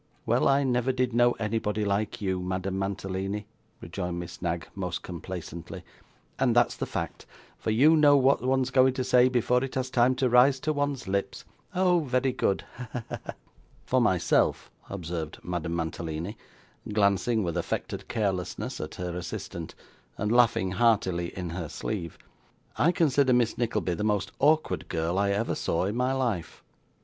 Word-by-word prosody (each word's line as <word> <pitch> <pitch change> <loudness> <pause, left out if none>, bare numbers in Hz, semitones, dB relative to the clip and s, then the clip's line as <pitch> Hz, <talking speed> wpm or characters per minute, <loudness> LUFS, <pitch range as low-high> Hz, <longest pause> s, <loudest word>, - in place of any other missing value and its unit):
'Well, 120 +2 +2
I 140 +1 +4
never 125 -1 +1
did 125 -1 0
know 120 +1 +4
anybody 105 -1 -1
like 100 +2 -1
you, 95 -1 0
Madame 95 +1 -2
Mantalini,' 95 +1 -3 0.4
rejoined 90 +1 -4
Miss 85 -1 -8
Knag 85 -1 -2
most 90 -3 -4
complacently, 85 -1 -7 0.6
'and 125 -3 +2
that's 120 0 +4
the - - -4
fact, - - -5 0.3
for - - -3
you 140 +9 +5
know 145 -2 +6
what 135 -1 +3
one's 130 0 +1
going 130 -1 +4
to 130 - -1
say, 125 0 +5
before 125 0 +2
it 135 - -5
has 130 -1 -2
time 125 +1 +3
to 130 0 +1
rise 125 +3 +5
to 155 - 0
one's 145 -5 -2
lips. 100 +1 -2 0.3
Oh, 180 -1 +4
very 130 -3 0
good! 100 -5 0
Ha, 125 0 -7
ha, 125 - -4
ha!' - - -6 0.5
'For - - +2
myself,' - - +2 0.2
observed 85 -4 -5
Madame 85 -1 -3
Mantalini, 80 +3 -4 0.6
glancing 105 +2 +2
with 85 -3 -2
affected - - -3
carelessness 95 -5 -2
at 75 - -6
her 90 -1 -4
assistant, 85 -2 -6 0.4
and 105 +1 -1
laughing 115 -6 +3
heartily 95 -4 +2
in 90 -3 -4
her 85 -3 -5
sleeve, 90 -7 -4 0.6
'I 170 - +3
consider 140 -6 +3
Miss 120 -2 +2
Nickleby 105 -7 -1
the 95 - -3
most 105 -3 0
awkward 155 +3 +2
girl 85 +2 -1
I 100 0 +2
ever 100 +3 0
saw 85 +2 -1
in 100 +3 -2
my 125 +1 +1
life. 115 -12 -2
105 Hz, 165 wpm, -27 LUFS, 90-125 Hz, 0.6 s, know